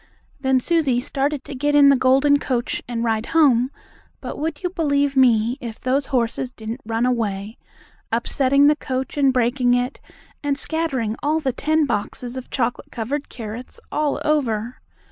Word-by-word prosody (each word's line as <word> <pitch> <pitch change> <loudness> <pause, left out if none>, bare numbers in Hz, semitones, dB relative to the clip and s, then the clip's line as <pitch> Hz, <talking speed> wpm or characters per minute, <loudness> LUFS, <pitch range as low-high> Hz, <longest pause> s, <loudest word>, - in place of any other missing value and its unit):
Then 265 -1 +2
Susie 285 -4 +1
started 275 +3 -2
to - - -8
get 290 +3 0
in 285 -1 +7
the 275 - +6
golden 270 +3 +4
coach 250 -3 -2
and 235 -1 -3
ride 225 -1 0
home, 255 -5 +5 0.5
but, - - -7
would 310 +2 -3
you 360 - -1
believe 285 -5 +1
me, 240 -1 +3
if 230 -3 -7
those 265 +2 0
horses 250 -1 -1
didn't 230 0 -7
run 225 +1 0
away, 220 -4 -2 0.5
upsetting 265 +4 +2
the 300 +1 +5
coach 265 -2 -4
and 275 -2 +4
breaking 245 0 +2
it, 250 +2 -2 0.4
and 285 -1 -1
scattering 270 -8 -2
all 305 +2 +1
the 270 -5 -1
ten 310 +3 +1
boxes 240 +2 -3
of 260 -1 -7
chocolate 245 -2 -2
covered 270 +6 -3
carrots 230 +1 -7
all 300 -1 0
over. 245 -6 0
260 Hz, 165 wpm, -22 LUFS, 235-285 Hz, 0.5 s, in